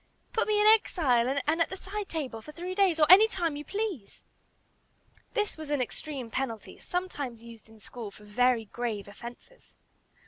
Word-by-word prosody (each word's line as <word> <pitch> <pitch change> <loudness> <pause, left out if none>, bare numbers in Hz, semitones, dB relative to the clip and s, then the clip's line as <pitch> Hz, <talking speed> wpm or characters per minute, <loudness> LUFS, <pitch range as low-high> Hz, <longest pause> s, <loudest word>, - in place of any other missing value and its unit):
Put 450 - +1
me 425 -1 +2
in 420 - +4
'exile' 280 - +4
and 320 +3 +1
at - - +2
the 380 - -6
'side 405 +2 -5
table,' 265 -9 -4
for 300 - -10
three 355 +4 -5
days, 370 -4 +3
or 305 - +7
any 385 +6 +9
time 345 -8 -1
you 295 - -5
please!" 390 - -4 1.1
This 420 -6 0
was 310 -2 -8
an 290 -1 +1
extreme 255 -1 -4
penalty, 230 -4 -4
sometimes 285 -10 -4
used 230 -1 -13
in 220 - -16
school 225 0 -8
for 210 - -14
very 235 +2 +2
grave 220 -2 -4
offences. 240 - -12
295 Hz, 175 wpm, -29 LUFS, 235-370 Hz, 1.1 s, any